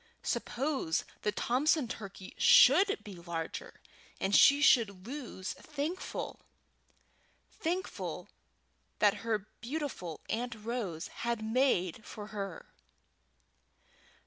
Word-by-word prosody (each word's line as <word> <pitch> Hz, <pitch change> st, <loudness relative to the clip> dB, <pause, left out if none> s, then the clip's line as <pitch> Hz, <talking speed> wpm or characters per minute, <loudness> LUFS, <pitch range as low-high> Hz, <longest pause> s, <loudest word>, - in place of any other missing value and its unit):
Suppose 265 Hz, -, -1 dB, 0.2 s
the 210 Hz, -, +1 dB
Thompson 265 Hz, +6 st, +2 dB
turkey 195 Hz, -4 st, -8 dB
should 400 Hz, +1 st, +6 dB
be 205 Hz, -, -9 dB
larger, 170 Hz, -2 st, -6 dB, 0.4 s
and 195 Hz, +1 st, +1 dB
she 280 Hz, +1 st, +8 dB
should 205 Hz, -9 st, +4 dB
lose 245 Hz, -7 st, -5 dB
Thankful 310 Hz, +5 st, -4 dB, 1.1 s
Thankful 355 Hz, +3 st, -3 dB, 0.7 s
that 210 Hz, 0 st, +4 dB
her 215 Hz, -3 st, -1 dB, 0.2 s
beautiful 245 Hz, -, -4 dB
Aunt 235 Hz, +1 st, -2 dB
Rose 215 Hz, -7 st, -4 dB
had 235 Hz, -2 st, -1 dB
made 220 Hz, -6 st, +1 dB
for 210 Hz, 0 st, -8 dB
her? 195 Hz, -4 st, -5 dB
225 Hz, 95 wpm, -32 LUFS, 195-280 Hz, 1.1 s, she